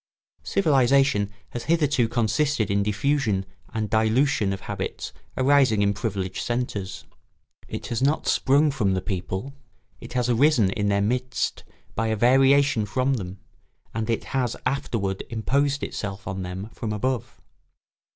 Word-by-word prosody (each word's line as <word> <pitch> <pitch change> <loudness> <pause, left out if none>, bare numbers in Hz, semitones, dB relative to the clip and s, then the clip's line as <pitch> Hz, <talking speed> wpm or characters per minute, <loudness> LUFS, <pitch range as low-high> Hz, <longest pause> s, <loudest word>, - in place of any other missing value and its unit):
Civilisation 135 - +3 0.2
has 120 - -6
hitherto 145 -7 +2
consisted 120 0 +1
in 100 0 +2
diffusion 105 -1 0 0.3
and 110 -1 -2
dilution 110 0 +2
of 95 - -4
habits - - -5 0.2
arising 130 -6 +4
in 100 0 +2
privileged 95 -3 -3
centres. 120 -6 -3 0.6
It - - -6
has 120 0 -2
not 145 +3 +1
sprung 145 +3 +3
from 100 -8 +1
the 95 - -1
people; 95 +6 -4 0.5
it - - -10
has 125 -1 +1
arisen 120 -4 +4
in 105 +1 -1
their 100 0 +2
midst 125 +4 -1 0.3
by 115 +1 -1
a 110 - +1
variation 135 0 +4
from 130 +5 +1
them, 95 -6 -4 0.6
and 110 +1 -3
it 115 - 0
has 125 -3 -1
afterward 110 -8 -1
imposed 140 +5 0
itself 100 -2 -5
on 95 0 -3
them 95 +3 -5
from 110 - -4
above. 125 +2 -2
115 Hz, 140 wpm, -25 LUFS, 100-135 Hz, 0.6 s, arising